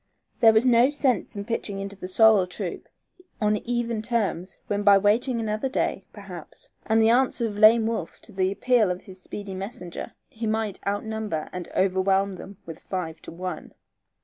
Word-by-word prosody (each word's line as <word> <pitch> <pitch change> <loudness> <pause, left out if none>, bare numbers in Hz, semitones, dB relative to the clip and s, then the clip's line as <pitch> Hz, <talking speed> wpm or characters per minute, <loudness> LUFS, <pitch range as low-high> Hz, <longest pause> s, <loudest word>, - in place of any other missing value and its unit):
There 225 - +7
was 220 +3 +3
no 245 +1 +5
sense 270 -9 0
in 200 0 -5
pitching 220 -3 -3
into 200 0 -5
the 185 -1 -7
sorrel 210 -1 +5
troop 180 - -6 0.5
on 210 -2 +2
even 235 -1 -2
terms 210 -6 -2
when 205 0 -1
by 200 -1 +7
waiting 230 +5 +2
another 215 +3 -2
day, 265 - -2
perhaps, - - -10 0.2
and 220 0 +3
the 225 0 +5
answer 245 -1 +2
of 205 -2 -4
Lame 220 +1 +7
Wolf 225 -7 -3
to - - -10
the 190 -1 0
appeal 220 +1 +2
of 180 0 -3
his 185 -1 -13
speedy 200 +1 -7
messenger, 185 -2 -7
he 225 0 -5
might 215 -2 -1
outnumber 205 -5 -3
and 180 -1 -6
overwhelm 190 0 +2
them 195 +1 -10
with 165 -1 -9
five 165 -4 -5
to - - -10
one. 180 +2 -6
210 Hz, 175 wpm, -25 LUFS, 190-225 Hz, 0.5 s, There